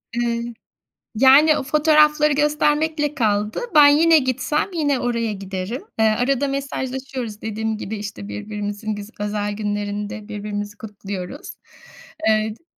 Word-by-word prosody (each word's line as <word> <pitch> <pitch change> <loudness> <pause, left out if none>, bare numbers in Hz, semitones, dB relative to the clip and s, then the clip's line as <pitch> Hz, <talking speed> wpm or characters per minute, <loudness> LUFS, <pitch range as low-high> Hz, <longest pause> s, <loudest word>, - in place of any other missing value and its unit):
Iıı, 235 0 -2 0.6
yani 275 +6 +6
o - - -3
fotoğrafları 300 +1 +4
göstermekle 295 +1 +1
kaldı. 210 -4 0 0.2
Ben 295 -1 +9
yine 320 +3 +6
gitsem 260 +3 -1
yine 290 -5 +1
oraya 235 -2 -1
giderim. 195 +4 -5 0.2
Eee, 220 - +4
arada 250 +5 +1
mesajlaşıyoruz. 265 -4 -4
Dediğim 220 0 -3
gibi 220 0 -5
işte 200 - -7
birbirimizin 205 - -5
güz 205 0 -8
özel 205 0 -2
günlerinde 205 0 -4
birbirimizi 205 -1 -5
kutluyoruz. 200 +3 -7 0.7
Eee, 215 0 +2
t 230 - -22
225 Hz, 120 wpm, -21 LUFS, 205-285 Hz, 0.7 s, Ben